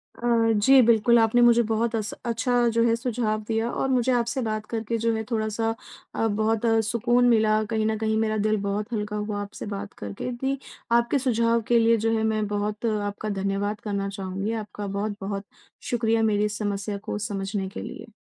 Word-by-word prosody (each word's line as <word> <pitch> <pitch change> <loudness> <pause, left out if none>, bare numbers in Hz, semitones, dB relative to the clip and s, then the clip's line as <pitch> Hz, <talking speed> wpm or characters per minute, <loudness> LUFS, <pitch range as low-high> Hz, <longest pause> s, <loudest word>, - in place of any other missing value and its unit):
अ, 240 - -7 0.3
जी 260 +6 +6
बिल्कुल 235 0 +5
आपने 225 +2 +3
मुझे 240 0 +6
बहुत 230 +1 0
अस 215 -2 -2
अच्छा 240 +1 +1
जो 230 - +5
है 230 -1 +3
सुझाव 230 -3 -1
दिया 225 +1 0
और 270 - -1
मुझे 255 -1 +2
आपसे 245 +2 0
बात 215 -2 -2
करके 225 0 -3
जो 230 +1 +1
है 220 - -2
थोड़ा-सा 225 0 0 0.4
अ, 225 - +1
बहुत 220 +1 0 0.2
सुकून 240 +3 +2
मिला 215 -2 +3
कहीं 220 -1 0
न 220 0 0
कहीं 220 0 0
मेरा 220 -1 0
दिल 215 0 +2
बहुत 205 +3 -3
हल्का 210 -1 -2
हुआ 210 0 -3
आपसे 205 0 -7
बात 200 +1 -7
करके 100 - -5
दि 270 +1 0 0.4
आपके 240 +4 0
सुझाव 235 -2 +2
के 240 -1 +4
लिए 230 0 +4
जो - - +2
है 220 - 0
मैं 215 -1 0
बहुत 210 +2 -2
आपका 210 -1 -2
धन्यवाद 200 +1 -2
करना 200 -2 -2
चाहूँगी। 195 +1 -4
आपका 210 -2 -5
बहुत-बहुत 200 0 -4 0.4
शुक्रिया 230 -2 +1
मेरी 210 -1 +2
इस 210 -1 -3
समस्या 205 -1 -2
को 205 - -5
समझने 200 -1 -3
के - - -7
लिए। 225 0 -8
220 Hz, 190 wpm, -25 LUFS, 205-230 Hz, 0.4 s, जी